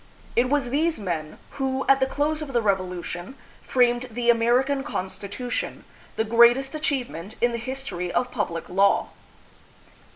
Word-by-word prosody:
It 250 +1 +3
was 275 -4 +1
these 320 +2 +1
men 165 -6 -4
who, 265 -1 -2
at 275 0 +5
the 265 - +2
close 300 +3 -1
of 285 -3 -6
the 240 - +3
Revolution, 185 +1 -2 0.3
framed 245 0 +2
the 240 +1 +3
American 250 +4 +2
Constitution, 205 0 -4 0.3
the 220 - +1
greatest 235 +5 +5
achievement 245 - -3
in 240 - +3
the 235 - -3
history 230 -9 -4
of 250 0 0
public 175 -7 -3
law. 195 +2 +3
240 Hz, 140 wpm, -25 LUFS, 200-270 Hz, 0.3 s, at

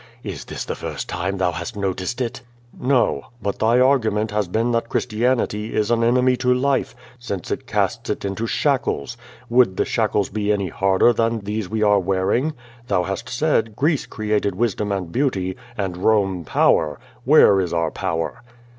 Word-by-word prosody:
"Is - - -6
this - - -6
the - - -3
first - - -5
time 95 +3 -2
thou 90 -2 +1
hast 85 +2 -6
noticed 95 +4 -2
it?" 125 +1 -3 0.3
"No. 130 -1 +1
lUit 100 -2 -3
thy 115 +3 +3
argument 110 -5 +2
has 105 -2 0
been 115 +6 0
that 115 0 -1
Christianity 110 -2 0
is 110 +1 +1
an 115 -1 +2
enemy 125 +2 +3
to 125 0 +1
life, 130 +1 +1 0.2
since 100 -7 -5
it - - -3
casts - - -1
it - - -2
into 100 +4 -2
shackles. 130 - 0 0.3
Would 120 -6 +3
the - - +2
shackles 100 -2 0
be 105 0 -1
any 100 -3 0
harder 95 +6 +3
than 115 0 0
these 105 -1 -4
we 110 0 0
are 105 -1 +5
wearing? 100 - 0 0.3
Thou 95 -4 +1
hast 95 +1 -4
said, 120 -5 0
^Greece 150 +3 0
created 105 -3 -1
wisdom 105 -1 -1
and 95 -4 -3
beauty, 95 -9 0 0.2
and 95 -4 -2
Rome 95 -3 +1
power.' 75 -1 +2 0.2
Where 95 -1 +6
is 90 -3 -2
our 85 -2 0
power?" 80 0 -3
105 Hz, 170 wpm, -21 LUFS, 95-120 Hz, 0.3 s, Where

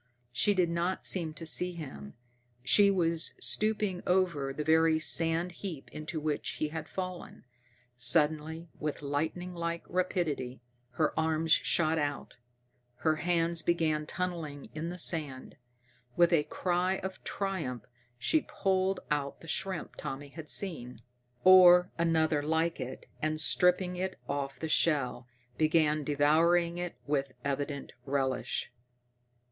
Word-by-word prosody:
She 205 +11 +2
did 175 -3 +2
not 170 +2 -1
seem 165 -4 +1
to 165 - -8
see 180 +3 +4
him. 130 - -9 0.5
She 200 +8 +6
was 165 -4 +1
stooping 210 -4 +2
over 175 -7 +1
the 150 +3 -4
very 160 +1 +4
sand 165 +2 +1
heap 170 -5 -7
into 155 +1 -5
which 150 -1 -2
he 155 - -2
had 160 0 -6
fallen. 185 -1 -6 0.5
Suddenly, 155 +6 +1
with 150 -1 -4
lightning 160 +6 -3
like 170 -1 -3
rapidity, 170 -8 -2 0.3
her 155 +2 +1
arms 160 0 0
shot 160 0 +3
out, 145 -1 -3 0.7
her 155 -1 +3
hands 170 0 0
began 155 -3 0
tunneling 165 -6 -4
in 160 +2 -4
the 180 - -6
sand. 150 -7 -3 0.6
With 175 0 +4
a 150 -3 +3
cry 180 +1 0
of 190 0 -6
triumph 165 - -3 0.3
she 305 - +1
pulled 190 -1 0
out 140 -1 -2
the 165 - -12
shrimp 190 +1 -3
Tommy 145 -1 -6
had 155 +1 -10
seen, 125 - -1 0.4
or 180 -1 +8
another 160 -2 +2
like 160 +2 0
it, 130 0 -6 0.2
and, 155 0 -1
stripping 180 +2 +3
it 185 +1 -3
off 140 -1 -3
the 160 - -3
shell, 140 -6 +1 0.3
began 155 -1 +2
devouring 165 +4 +2
it 175 -1 -4
with 140 -2 -1
evident 140 0 -3
relish. 135 -3 -2
160 Hz, 130 wpm, -30 LUFS, 150-180 Hz, 0.7 s, or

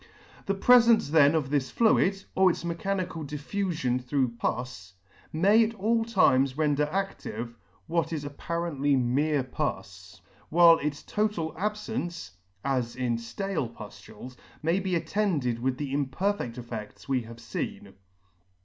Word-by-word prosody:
The 195 - +1
prefence 235 - +5
then 150 -1 +5
of 145 -4 -1
this 135 -3 0
fluid, 200 - +2
or 190 0 +5
its 170 - -3
mechanical 175 0 -2
dif 145 0 -8
fufion 160 -11 -1
through 130 0 +1
pus, 115 -5 -4 0.4
may 200 +8 +4
at 225 +1 -2
all 225 +3 +1
times 140 - +3
render 150 -1 +2
adive, 165 -9 -4 0.3
what 165 -1 -1
is 150 -3 -3
ap 145 0 -7
parently 145 -5 0
mere 140 +4 +1
pus, 130 - -5 0.3
while 170 0 +7
its 145 0 -3
total 210 -7 -1
ab 210 +5 -1
fence 210 - -5 0.3
(as 125 -4 -1
in 125 -2 -1
ftale 125 - -3
puftules) 110 +3 -11 0.3
may 165 +4 +2
be 190 -2 -1
attended 160 - 0
with 130 +1 -1
the 140 -2 -4
imperfed 140 - -1
effeds 115 -3 -8
we 130 -2 +1
have 115 0 -11
feen. 100 -3 -6
150 Hz, 140 wpm, -27 LUFS, 130-190 Hz, 0.4 s, while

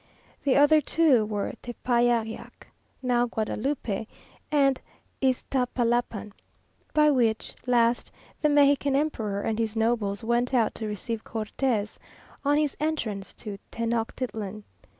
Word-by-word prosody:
The 275 - +3
other 290 +2 +6
two 280 -7 +3
were 205 -2 -2
Tepeyayac 240 -2 -1 0.4
(now 245 -1 +2
Guadalupe) 220 -1 -2 0.4
and 275 -3 +3 0.4
Iztapalapan, 245 -4 0 0.6
by 300 -1 +5
which 230 -5 +1
last 240 -1 +2 0.3
the 300 - +3
Mexican 285 -1 +4
emperor 220 -9 -1
and 220 +1 -1
his 225 -1 -1
nobles 220 -3 0
went 240 +3 +1
out 230 -3 +2
to 220 - -4
receive 215 +2 -4
Cortes 220 0 -2 0.4
on 290 +1 +3
his 300 -2 +1
entrance 245 -11 -2
to 205 -3 -7
Tenochtitlan. 225 -2 -3
240 Hz, 110 wpm, -27 LUFS, 220-275 Hz, 0.6 s, other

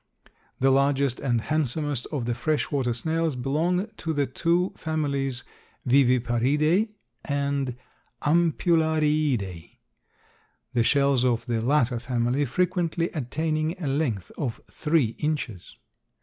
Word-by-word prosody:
The 135 +1 +4
largest 140 -1 +2
and 120 -4 0
handsomest 145 -2 -1
of 140 -6 -2
the 120 - 0
fresh 145 +2 -1
water 135 -4 0
snails 160 +5 -1
belong 160 +9 0
to 160 0 -3
the 145 -2 +1
two 170 +7 0
families 140 -5 -2 0.4
Viviparidae 135 - +3 0.3
and 140 -3 -1 0.5
Ampullariidae, 155 - +1 1.0
the 120 - +3
shells 140 0 +3
of 120 -2 +1
the 115 -2 -1
latter 125 -2 +2
family 125 +3 0
frequently 170 +3 0
attaining 155 +3 -2
a 170 - -4
length 135 - -1
of 125 -7 -2
three 150 -8 +1
inches. 150 - -3
140 Hz, 110 wpm, -26 LUFS, 125-155 Hz, 1.0 s, The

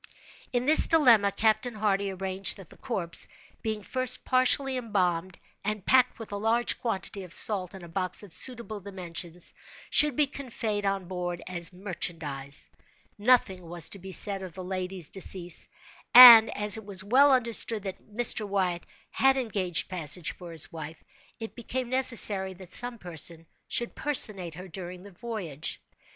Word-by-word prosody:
In 245 0 -1
this 310 +3 +6
dilemma, 235 -11 +4
Captain 220 +3 0
Hardy 200 -2 -1
arranged 190 +1 0
that 195 -5 -14
the - - -15
corpse, 180 -9 -2 0.3
being 215 -2 -4
first 255 +2 +1
partially 260 +1 +2
embalmed, 185 -7 -2 0.3
and 210 -1 -4
packed, 255 -1 +3
with 225 -2 -9
a 205 - -4
large 225 +3 -1
quantity 205 -3 -4
of 180 -3 -12
salt, 195 -2 -1
in 190 - -12
a - - -10
box 185 +4 -3
of 195 -5 -14
suitable 235 -4 -1
dimensions, 180 -3 -7 0.4
should 300 -3 +4
be 300 - +2
conveyed 230 -7 -5
on 195 -1 -2
board 175 -1 -6
as 175 -2 0
merchandise. 165 -7 -6 0.5
Nothing 210 -5 +2
was 170 -1 -3
to 200 - -10
be 190 +1 -10
said 195 +1 +2
of 185 -3 -10
the 185 - -8
lady's 185 -2 -3
decease; 180 -3 +1 0.5
and, 235 -3 +11
as 210 +1 0
it 220 - -9
was 195 -2 -2
well 265 +8 +4
understood 230 -4 +2
that 190 -2 -8
Mr. 220 -1 +3
Wyatt 185 -3 -2 0.2
had 270 0 +2
engaged 195 -9 -2
passage 170 -2 -1
for 175 -2 -12
his 160 -3 0
wife, 160 -1 -9 0.4
it 225 -1 -8
became 245 +1 -5
necessary 215 -7 +4
that 185 -1 -12
some 245 0 +5
person 165 -3 -5 0.2
should 240 - -2
personate 200 - 0
her 185 +2 -10
during 180 0 -9
the 200 - -13
voyage. 175 -8 -6
195 Hz, 160 wpm, -27 LUFS, 180-230 Hz, 0.5 s, and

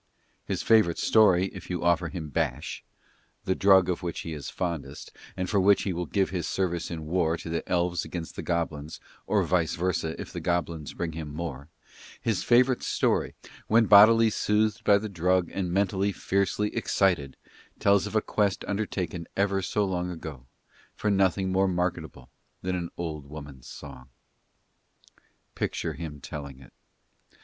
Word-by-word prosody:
His - - -3
favourite 110 -7 +4
story 95 -4 +4
if 90 -2 -10
you 90 -1 -3
offer 85 0 +2
him 80 -5 -6
bash 70 - -2 0.6
the 95 - +2
drug 95 -2 +5
of 90 0 -1
which 85 -2 -4
he 80 - -5
is 75 -3 -6
fondest, 85 -5 -5 0.3
and 90 - -2
for 100 - +2
which 100 +1 +4
he 95 - -1
will 85 +1 -3
give 95 -2 0
his 85 -4 -2
service 85 -3 -1
in 80 -2 -5
war 85 0 +1
to 85 - -8
the 85 0 -1
elves 90 0 +1
against 85 -2 -6
the - - -4
goblins, 80 -3 -3 0.3
or - - +2
vice 85 -3 +1
versa 85 -2 -2
if - - -7
the - - -4
goblins 85 -4 -2
bring 85 -2 -3
him 80 -2 -6
more 75 -2 -6 0.5
his 110 -5 -1
favourite 125 +1 +4
story, - - 0 0.3
when 115 +1 +5
bodily 110 +2 +7
soothed 105 +1 +1
by 100 - +5
the 110 +2 -4
drug 90 -2 +1
and 90 -3 -2
mentally 100 +1 +1
fiercely 100 +2 -1
excited, 85 -9 +1 0.4
tells 100 0 +3
of 105 - -7
a 110 - +3
quest 100 -3 0
undertaken 95 -5 -3
ever 100 0 +1
so 105 +3 0
long 90 -2 -2
ago 75 -7 -8 0.5
for 105 - 0
nothing 95 -1 +2
more 95 +1 +3
marketable 90 -7 -3 0.4
than 90 0 -1
an 85 -1 -3
old 75 -4 -5
woman's 70 -4 -10
song. 65 -3 -11 1.4
Picture - - -2
him 80 -3 -7
telling 70 -1 -8
it. 65 - -16
90 Hz, 165 wpm, -27 LUFS, 80-100 Hz, 1.4 s, bodily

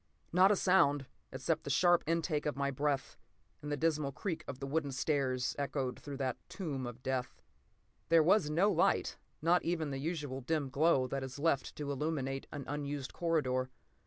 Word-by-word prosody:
Not 185 +2 +6
a - - +5
sound, 165 -8 +3 0.3
except 150 +5 -1
the - - -5
sharp 175 +5 +4
intake 165 -2 0
of 150 - -1
my 140 0 0
breath 140 0 -1 0.4
and 150 - -5
the 145 - 0
dismal 150 -2 +1
creak 165 +2 -4
of 135 - -5
the 135 - -4
wooden 145 0 -1
stairs, 130 -2 0
echoed 135 -3 -2
through 140 -2 -7
that 130 -2 -1
tomb 140 - -4
of 120 +1 -9
death. 130 -1 -2 0.7
There 165 -1 +6
was 170 -1 +4
no 180 +7 +3
light, - - +1 0.2
not 175 +2 +4
even 160 -4 -1
the 135 - -3
usual 145 -3 -3
dim 145 0 -1
glow 140 -2 +3
that 135 +1 -3
is 135 +1 -6
left 140 -3 0
to 145 -1 -4
illuminate 135 -2 -2
an 145 -3 -6
unused 145 -1 -4
corridor. 130 -7 0
145 Hz, 180 wpm, -33 LUFS, 135-165 Hz, 0.7 s, Not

